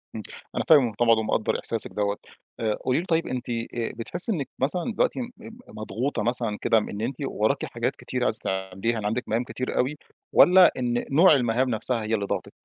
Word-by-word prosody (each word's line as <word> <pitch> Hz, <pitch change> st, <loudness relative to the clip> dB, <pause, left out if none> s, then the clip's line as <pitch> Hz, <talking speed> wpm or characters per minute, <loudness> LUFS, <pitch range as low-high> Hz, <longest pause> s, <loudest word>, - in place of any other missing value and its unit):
إمم، 110 Hz, -, -4 dB, 0.3 s
أنا -, -, 0 dB
فاهمِك 130 Hz, -9 st, +5 dB
طبعًا 115 Hz, 0 st, +4 dB
ومقدر 110 Hz, 0 st, 0 dB
إحساسِك 115 Hz, -2 st, -3 dB
دوّة. 100 Hz, -1 st, -1 dB, 0.4 s
آآ، 110 Hz, -2 st, 0 dB
قولي 130 Hz, +4 st, +2 dB
لي 175 Hz, -, -4 dB
طيب 165 Hz, -1 st, +1 dB
أنتِ 125 Hz, -1 st, -4 dB
آآ 115 Hz, -1 st, -1 dB, 0.4 s
بتحسي 125 Hz, -, -3 dB
إنِك 150 Hz, -9 st, -2 dB
مثلًا 175 Hz, -, -1 dB
دلوقتي -, -, +1 dB
م 240 Hz, -, -5 dB, 0.4 s
مضغوطة 110 Hz, +4 st, -3 dB
مثلًا 115 Hz, -2 st, -1 dB
كده 115 Hz, -, +3 dB
إن 105 Hz, -1 st, -2 dB
أنتِ 120 Hz, +4 st, -2 dB
وراكِ -, -, 0 dB
حاجات -, -, -2 dB
كتيرة -, -, -4 dB
عايزة -, -, 0 dB
تعمليها 95 Hz, +4 st, -2 dB
عندِك 115 Hz, +4 st, -1 dB
مهام 115 Hz, +3 st, 0 dB
كتير 130 Hz, +1 st, -4 dB
أوي، 135 Hz, +4 st, 0 dB, 0.4 s
والّا 180 Hz, 0 st, +7 dB
إن 120 Hz, -1 st, -1 dB
نوع 170 Hz, +7 st, +7 dB
المهام 125 Hz, 0 st, +1 dB
نفسها 115 Hz, +1 st, -1 dB
هي 110 Hz, +1 st, -2 dB
اللي 100 Hz, -, -2 dB
ضاغطِك؟ -, -, -3 dB
120 Hz, 190 wpm, -25 LUFS, 110-135 Hz, 0.4 s, والّا